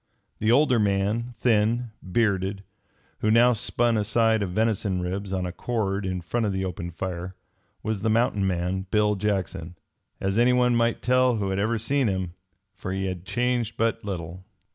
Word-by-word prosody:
The 110 +2 +2
older 125 -2 +4
man, 105 +4 0
thin, 115 +1 +1
bearded, 95 -1 0 0.6
who 105 - +1
now 120 +3 +6
spun 120 0 +1
a 105 - +1
side 110 0 +2
of 100 - -1
venison 105 -1 0
ribs 95 +2 -3
on 95 -1 -1
a 90 - -3
cord 100 -1 -2
in 95 -1 -2
front 110 +6 -1
of - - 0
the 95 0 -2
open 85 -1 -4
fire, 90 +1 -5 0.5
was 110 -3 -2
the 110 - +1
mountain 110 -3 +2
man, 95 +1 -2
Bill 105 -1 +3
Jackson, 95 -4 -2 0.4
as 95 +3 0
anyone 125 0 +4
might 115 0 +1
tell 125 0 +3
who 100 -3 -1
ever 100 +4 0
had 115 - -2
seen 135 +2 +1
him, 95 -3 -2 0.4
for - - -6
he 95 0 -2
had 90 -1 -4
changed 120 -1 -1
but 115 0 0
little. 90 -2 -5
105 Hz, 175 wpm, -25 LUFS, 95-115 Hz, 0.6 s, now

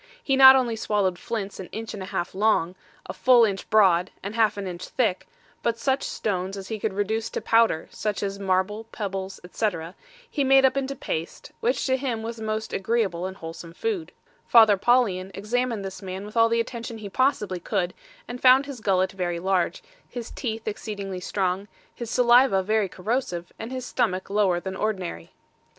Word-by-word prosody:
He 270 - +2
not 265 0 +10
only 245 -3 +1
swallowed 205 -5 0
flints 210 -4 -4
an 185 - -7
inch 225 0 -6
and 205 - -7
a 185 - -6
half 175 - -3
long, 195 -4 +2 0.3
a - - -6
full 245 -2 +5
inch 195 -2 -3
broad, 190 -4 +4
and 200 +2 -4
half 220 -2 +2
an 200 - -4
inch 180 -1 -6
thick, 220 -8 -1 0.3
but 230 -1 0
such 265 +3 0
stones 190 -1 -3
as 190 -1 -8
he 220 -1 -3
could 210 -1 -2
reduce 220 +3 -1
to - - -3
powder, 225 -7 +2
such 210 -1 -3
as 200 0 -3
marble, 195 +3 0
pebbles, 195 -3 -5
etc., 180 -3 -3 0.3
he 290 -10 -1
made 270 0 +6
up 265 - +3
into 275 0 -2
paste, 170 - -5
which 475 +2 0
to 260 -1 +2
him 245 -5 -3
was 230 0 -5
a - - -6
most 220 0 -3
agreeable 195 -4 0
and 190 0 -8
wholesome 165 +1 -9
food. 400 - -3 0.4
Father 220 -3 +7
Paulian 200 -4 +2
examined 230 0 -1
this 190 +1 -7
man 190 +1 -6
with 210 - -11
all 230 0 +5
the 230 0 +1
attention 230 0 -4
he 215 -2 -7
possibly 210 -4 0
could, 180 0 -1 0.3
and 245 +1 -7
found 260 +2 +6
his 275 -5 -8
gullet 190 -2 +2
very 180 -2 -2
large, 185 0 0 0.3
his 240 -2 -7
teeth 225 -3 -4
exceedingly 200 -3 -4
strong, 190 +1 -1 0.3
his 235 -2 -7
saliva 240 -4 +5
very 215 0 +1
corrosive, 180 -3 -3
and 225 +3 -6
his 255 -1 -4
stomach 195 -7 -1
lower 200 -4 +2
than 190 +1 -5
ordinary. 185 - -3
210 Hz, 190 wpm, -25 LUFS, 190-235 Hz, 0.4 s, not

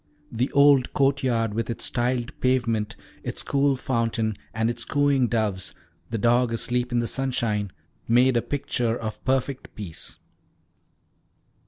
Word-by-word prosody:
The 120 +3 -1
old 140 -2 +5
courtyard, 130 -5 +1
with 115 +2 -2
its 115 - -1
tiled 120 +1 0
pavement, 115 -5 +1 0.3
its - - -4
cool 140 0 +2
fountain, 115 -4 -1 0.2
and 110 0 0
its 120 0 -2
cooing 140 -3 +2
doves, 110 -5 -1 0.3
the 115 - -2
dog 120 +2 +3
asleep 125 +2 0
in 120 - +1
the 120 -1 +1
sunshine, 115 -7 -1 0.4
made 125 +2 +4
a 120 - +3
picture 120 -4 -1
of 110 -1 -6
perfect 130 0 -1
peace. 95 -7 -6
120 Hz, 135 wpm, -25 LUFS, 115-130 Hz, 0.4 s, old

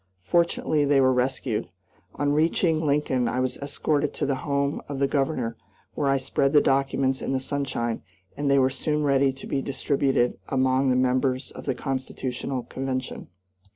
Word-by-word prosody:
Fortunately 165 - +1
they 140 -1 +3
were 130 -1 +4
rescued. 125 -5 -1 0.5
On 145 0 +1
reaching 160 +1 +2
Lincoln 140 -4 +1
I 125 +2 -1
was 130 0 -1
escorted 145 +1 -1
to - - -1
the 140 - +1
home 140 0 -1
of 140 - -4
the 140 - +2
Governor, 135 -4 -1 0.4
where 145 - -1
I 135 - +3
spread 135 +1 0
the 150 - +8
documents 135 -1 +1
in - - -2
the 130 - +1
sunshine, 130 -4 -2 0.3
and 145 -1 -1
they 140 - +4
were 130 -1 +3
soon 150 +3 -1
ready 140 -1 +3
to 135 - -10
be 135 - -1
distributed 135 -2 0
among 130 0 +2
the 125 - +3
members 130 +1 +1
of - - -10
the 135 - 0
constitutional 130 -1 -3
convention. 130 -1 -4
135 Hz, 170 wpm, -25 LUFS, 130-140 Hz, 0.5 s, the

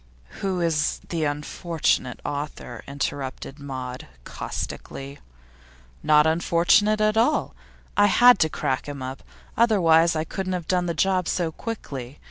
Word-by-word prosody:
'Who 190 -2 -1
is 160 -3 +1
the 165 -3 -1
unfortunate 150 -2 -1
author?' 145 -4 -5
interrupted 140 0 -4
Maud, 130 -2 -6 0.2
caustically. 140 +1 -6 0.8
'Not 150 0 +5
unfortunate 175 +6 +3
at 215 0 +2
all. 245 +7 +2 0.4
I 205 0 +5
had 245 +1 +6
to 160 - +3
crack 135 -3 -2
him 140 -2 -6
up; 130 +1 -6 0.3
otherwise 170 -8 +4
I 155 - 0
couldn't 185 +3 -4
have 175 -3 -4
done 180 -1 +1
the 170 - -2
job 185 +1 +1
so 170 -3 0
quickly. 145 - -6
160 Hz, 130 wpm, -24 LUFS, 140-185 Hz, 0.8 s, had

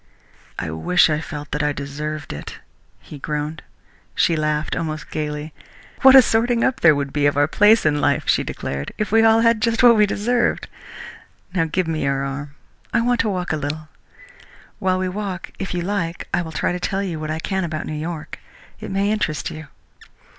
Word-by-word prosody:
"I 80 - -3
wish 155 - +3
I 150 0 0
felt 150 -3 -7
that 150 - -1
I 150 0 +1
deserved 145 +2 -5
it," 75 - -8 0.4
he 150 - -11
groaned. 150 +2 -4 0.5
She 165 - +3
laughed 150 0 -1
almost 155 -3 -4
gaily. 150 0 -4 0.5
"What 265 -1 +8
a 265 - +10
sorting 230 +1 +1
up 260 - +1
there 160 -3 +6
would 140 -1 -3
be 145 -1 +2
of 145 - 0
our 145 0 +4
places 210 +6 +4
in 150 -1 +2
life," - - +2
she - - +3
declared, 70 +1 -5
"if 215 - -2
we 225 +1 +5
all 225 0 +5
had 230 -1 +3
just 230 +1 +1
what 240 -1 +8
we 210 -1 +4
deserved!... 240 +5 0 0.9
Now 175 -4 +2
give 175 +2 -1
me 160 -1 -2
your 140 0 0
arm. 140 +1 -6 0.4
I 235 - +2
want 245 0 +1
to 220 - +2
walk 180 -4 -2
a - - 0
little. 150 +2 -5 0.9
While 185 -1 +1
we 185 0 -1
walk, 190 -1 -5
if 190 - -4
you 175 -1 -2
like, 175 -3 -3
I 175 - +2
will 160 -2 -6
try 160 - -1
to 180 - -3
tell 195 +2 -1
you 170 -5 -4
what 155 0 -5
I 155 - -2
can 190 +3 -2
about 155 -2 -3
New - - -5
York. 155 +1 -5 0.4
It - - -7
may 195 +2 0
interest 165 -9 -1
you." 155 -1 -9
160 Hz, 205 wpm, -21 LUFS, 150-205 Hz, 0.9 s, a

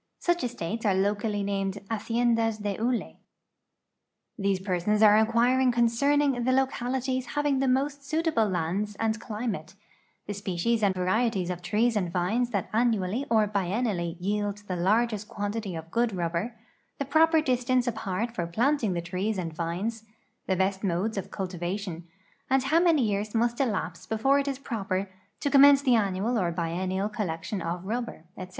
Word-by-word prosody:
Such 350 0 0
estati's 230 -3 -3
are 200 -4 +2
locally 205 +1 0
named 195 -1 -1 0.2
hacieiuhts 230 0 +1
dc 220 +4 0
hide. - - -16 1.2
These 195 -2 0
persons 190 +3 +1
are 215 +1 +7
incpiiring 245 +3 +3
concerning 250 +3 +2
the 255 - +2
localities 260 -1 0
having 290 -2 +2
the 270 - +1
most 275 +2 0
suitable 310 -7 +1
lands 190 +4 -2
and 220 +1 -1
climate, 210 -7 -4 0.5
the 205 - -4
species 200 +3 -1
and 195 -2 +2
varieties 185 0 0
of 180 -1 -5
trees 220 +6 +1
and 180 -5 0
vines 205 +8 0
that 200 -6 -3
anmially 225 +1 +1
or 220 -2 +4
biennial]}' 195 -3 -1
yield 205 +2 -2
the 185 - -2
largest 210 +4 +1
quantity 205 -2 -4
of 165 0 -8
good 235 -3 +1
rubber, 175 +6 -2 0.4
the 280 - -2
pro|)er 320 +3 +4
distance 255 -3 +1
apart 220 -1 -2
for 170 -7 -2
planting 230 - +1
the 170 -1 -3
trees 190 +5 -2
and 165 -3 -3
vines, 185 +8 -3 0.4
the 190 - +2
best 190 +1 0
modes 195 +4 0
of 195 - -4
cultivation, 180 -1 -4 0.4
and 265 0 +3
how^ 315 +5 +3
many 325 -6 +4
years 210 0 -1
must 235 +1 +1
elapse 185 -10 -2
before 270 +6 +2
it 280 - -2
is 275 -2 -2
proper 200 -7 -3 0.3
to 285 - -1
commence 280 0 +7
the 255 -3 +4
annual 215 +2 +1
or 175 -3 0
biennial 185 +3 -2
collection 195 -2 -3
of 170 +2 -4
rubber, 230 -4 -4
etc. 185 -1 -8
215 Hz, 160 wpm, -27 LUFS, 185-245 Hz, 1.2 s, are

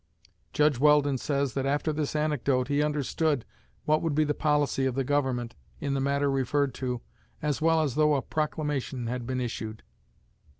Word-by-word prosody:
'" 85 -3 -42
Judge 150 -4 +3
Weldon 145 -2 +4
says 140 -2 -1
that 135 0 -1
after 145 +2 0
this 150 0 -2
anecdote 140 -4 +1
he 145 +1 +2
understood 150 -1 0 0.4
what 155 0 +3
would 160 -3 -1
be 155 - +4
the 150 -1 0
policy 145 -3 +1
of 130 - -2
the 135 - +1
Government 130 -4 0 0.3
in 140 - -2
the 135 - 0
matter 140 +1 +1
referred 135 +1 +1
to 125 -2 -3 0.4
as 150 0 -1
well 165 0 +3
as 140 -5 -1
though 150 0 +3
a 135 - -1
proclamation 150 -5 -2
had 120 0 -3
been 130 -1 -1
issued. 110 -3 -4
140 Hz, 180 wpm, -28 LUFS, 130-150 Hz, 0.4 s, Weldon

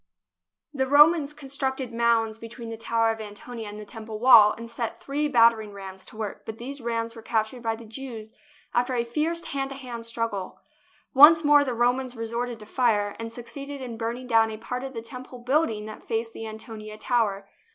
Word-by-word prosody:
The 265 -2 0
Romans 295 +1 +6
constructed 270 -3 -3
mounds 230 -1 +2
between 230 +1 -8
the 225 - -5
Tower 225 0 +1
of 225 0 -5
Antonia 215 +2 -7
and 210 +1 -8
the 210 - -8
Temple 220 0 -7
wall 225 -3 +8
and 230 +1 -8
set 230 0 -4
three 290 +2 -1
battering 230 -5 +4
rams 190 -1 -9
to 215 - -12
work, 215 -3 -5
but 220 - -7
these 270 +4 -7
rams 230 0 -2
were 225 - -9
captured 220 +2 -1
by 225 -1 -1
the 230 +1 -12
Jews 225 -2 -8 0.4
after 245 +1 +1
a 235 - +1
fierce 310 +8 -2
hand 270 -1 -2
to 275 - -6
hand 240 -4 -6
struggle. 230 -5 -3 0.5
Once 310 +4 +9
more 290 -1 +6
the 255 -4 -2
Romans 250 +2 +1
resorted 235 +1 -3
to - - -9
fire, 210 -4 +1
and 230 0 -5
succeeded 275 +4 -6
in 250 -3 -6
burning 235 +3 -4
down 225 -2 +4
a 215 - -6
part 250 +3 -5
of 265 -1 -7
the 225 - -5
Tem 250 +2 -7
ple 255 0 -11
building 245 -4 0
that 215 0 -8
faced 225 0 -3
the 225 - -6
Antonia 215 -1 -8
Tower. 210 -4 0
230 Hz, 200 wpm, -26 LUFS, 220-260 Hz, 0.5 s, Once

